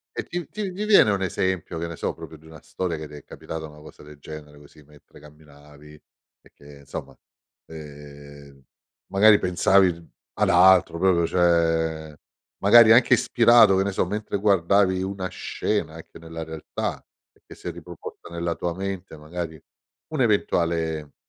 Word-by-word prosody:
E - - -3
ti 175 -2 -5
ti 200 -4 -5
ti 205 - -4
viene 205 - +5
un 100 -1 -1
esempio, 95 -2 -2
che 85 - -4
ne 85 - -7
so, - - -3
proprio 80 - -11
di 80 - -22
una 80 -1 -14
storia 90 -3 -4
che 75 0 -8
ti 75 - -16
è 75 - -11
capitata, 80 -1 -8
una 75 0 -15
cosa 75 - -15
del 75 -1 -14
genere 75 0 -11
così, 75 +1 -18
mentre 75 0 -20
camminavi 75 0 -17 0.5
e - - -23
che, 70 0 -16
insomma, 70 -1 -9 0.5
ehm, 70 -2 -13 0.5
magari 105 +2 +5
pensavi 90 -1 +2 0.2
ad - - 0
altro 90 -1 +5
proprio, 90 -2 +2
cioè 80 -3 0 0.4
magari 110 +2 +6
anche 120 +2 +5
ispirato, 115 -4 +5
che 95 - +2
ne 100 - -2
so, - - 0
mentre 105 +4 -4
guardavi 95 -1 +2
una 95 0 -4
scena - - -3
anche - - -13
nella 80 0 -8
realtà, 80 -1 -6 0.4
che - - -12
si - - -11
è - - -4
riproposta - - -11
nella 85 0 -3
tua 85 -1 -3
mente, 95 -2 -6
magari 80 +1 -7 0.5
un 155 -4 -3
eventuale 85 - 0
85 Hz, 165 wpm, -23 LUFS, 75-95 Hz, 0.5 s, magari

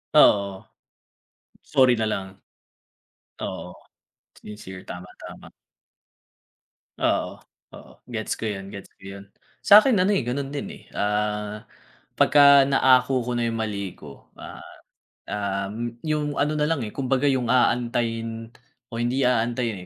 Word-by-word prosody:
Oo. 100 -2 +4 1.0
Sorry 130 -2 +4
nalang. 100 -3 -3 1.0
Oo - - -6 0.7
sincere 95 -3 -10
tama, 90 +1 -9
tama. - - -11 1.5
Oo, - - -1 0.4
oo - - -15 0.2
gets 110 -2 -3
ko 110 - -4
yun 95 -1 -7
gets 100 - -9
ko - - -34 0.2
yun. - - -15 0.4
Sa'kin 215 +5 +7
ano 190 - +2
eh 120 - -2
ganun 135 +3 -3
din 145 +7 -5 0.2
eh, - - -21
ah, 105 0 -2 0.6
pagka 140 -1 +6
naako 130 -1 +3
ko 125 +1 -4
na 120 - 0
yung 115 - -1
mali 100 -4 -4
ko, 70 -2 -15
ah, - - -11 1.0
um, 115 +4 -4 0.2
yung 150 -1 -1
ano 150 +2 +1
nalang 150 -4 0
eh, 105 - -9
kumbaga 135 +1 0
yung 130 -4 +1
aantayin 115 -2 0 0.5
o 115 - -4
hindi 125 +2 +1
aantayin 115 -4 0
120 Hz, 125 wpm, -24 LUFS, 105-135 Hz, 1.5 s, Sa'kin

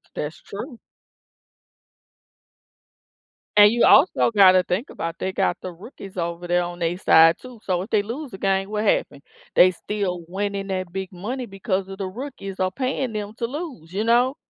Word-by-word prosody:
That's 150 +2 -5
true. 240 +6 -8 2.8
And 205 0 +9
you 235 +1 +2
also 290 -6 +5
gotta 185 -3 +6
think 185 +9 -2
about 165 0 -5
they 190 - -2
got 190 -2 0
the 185 - -6
rookies 195 +1 -12
over 170 0 -4
there 175 0 +2
on 175 0 -6
their 170 +1 -1
side 165 -2 +6
too, 250 -3 -12
so 180 -2 0
if 195 - -7
they 215 -2 +3
lose 245 +7 -6
the 190 - -8
game, 195 0 0
what 210 0 -2
happened? 140 -8 0 0.3
They 185 - +7
still 185 -1 -3
winning 200 +2 -3
that 185 -2 -4
big 190 -1 -4
money 230 +8 -5
because 195 -2 -3
of 195 - -8
the 195 -1 -3
rookies 205 -3 -7
are 185 0 +1
paying 260 +2 -2
them 210 0 -4
to 235 - 0
lose, 260 - -7
you 205 +4 -2
know? 245 +3 +3
195 Hz, 180 wpm, -23 LUFS, 180-230 Hz, 2.8 s, And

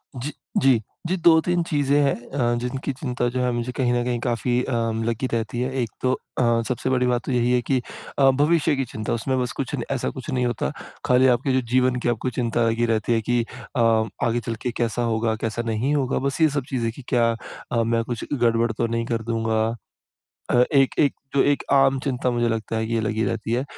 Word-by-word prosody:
जी, 135 +5 -4 0.3
जी। 130 -4 +4 0.3
जी, 185 - +1
2-3 170 +1 +4
चीजें 145 -3 +1
हैं 140 - +3 0.2
अ, 120 -3 0
जिनकी 130 +3 -3
चिंता 125 -2 -2
जो 125 +1 -3
है 125 - +1
मुझे 120 +1 -2
कहीं 125 -1 0
न 120 0 +1
कहीं 120 -1 -1
काफ़ी 120 0 0
अ, 130 - -4 0.3
लगी 115 +2 -1
रहती 115 +1 -2
है। 130 +1 -1
एक 115 - -2
तो 130 - +2 0.3
अ, - - +2 0.3
सबसे 130 +1 -2
बड़ी 125 -1 +2
बात 120 -1 +1
तो - - -2
यही 125 0 +2
है 125 -1 +3
कि 130 +1 0 0.4
अ, 135 -1 +6
भविष्य 150 +2 +2
की 135 -1 -1
चिंता। 110 -2 -4
उसमें 130 +3 -1
बस 125 - -2
कुछ - - -3
न - - -3
ऐसा - - -1
कुछ - - -8
नहीं 125 -1 0
होता, 110 - -1 0.3
खाली 125 +1 +5
आपके 130 +2 -1
जो 130 - +3
जीवन 130 0 +3
की - - +3
आपको 120 +2 -1
चिंता 120 -1 0
लगी 115 +1 +1
रहती 115 0 +1
है 115 - +1
कि 120 -1 +3 0.4
अ, - - +3 0.4
आगे 120 +1 +1
चल 115 0 -4
के 125 - -1
कैसा 120 +1 0
होगा, 110 0 0
कैसा 115 +1 -3
नहीं 115 +6 0
होगा। 135 -2 0
बस 140 +4 -3
ये 155 - +6
सब 140 -2 -2
चीजें 115 -4 -1
कि 135 - -11
क्या 120 -3 +3 0.4
अ, 115 -1 +2
मैं 115 0 +1
कुछ 120 -1 -4
गड़बड़ 115 -2 +2
तो 115 +1 -1
नहीं 115 0 -1
कर 115 -2 -2
दूँगा 115 -1 0 0.9
अ, 125 0 +5
एक 135 -2 +4
एक 145 - +3 0.2
जो 140 - +5
एक 145 -1 +2
आम 135 -1 +4
चिंता 125 -2 0
मुझे 120 -1 +1
लगता 110 0 -2
है 110 0 -1
कि 115 - -2
ये 115 - +1
लगी 110 0 -1
रहती 105 +3 -2
है। 125 +3 +1
120 Hz, 230 wpm, -23 LUFS, 115-130 Hz, 0.9 s, अ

